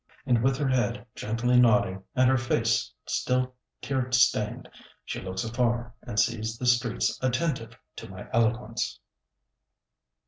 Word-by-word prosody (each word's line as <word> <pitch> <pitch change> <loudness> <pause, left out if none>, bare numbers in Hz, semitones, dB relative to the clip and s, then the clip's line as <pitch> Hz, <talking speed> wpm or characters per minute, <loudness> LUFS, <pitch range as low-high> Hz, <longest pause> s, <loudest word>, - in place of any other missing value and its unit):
And 120 -2 +3
with 135 0 +2
her 145 -1 0
head 120 -4 0
gently 120 +3 +1
nodding, 100 -5 +3
and 130 0 +4
her 130 - +4
face 120 - +1
still 130 0 0 0.3
tear 130 -2 -1
stained, 115 -3 +2 0.4
she - - -5
looks 95 0 -4
afar, 120 0 -1
and 115 -4 -3
sees 110 +1 0
the 125 - -4
streets 120 - +1
attentive 130 -1 -1 0.2
to - - -8
my - - -9
eloquence! 115 +1 0
120 Hz, 135 wpm, -27 LUFS, 110-125 Hz, 0.4 s, and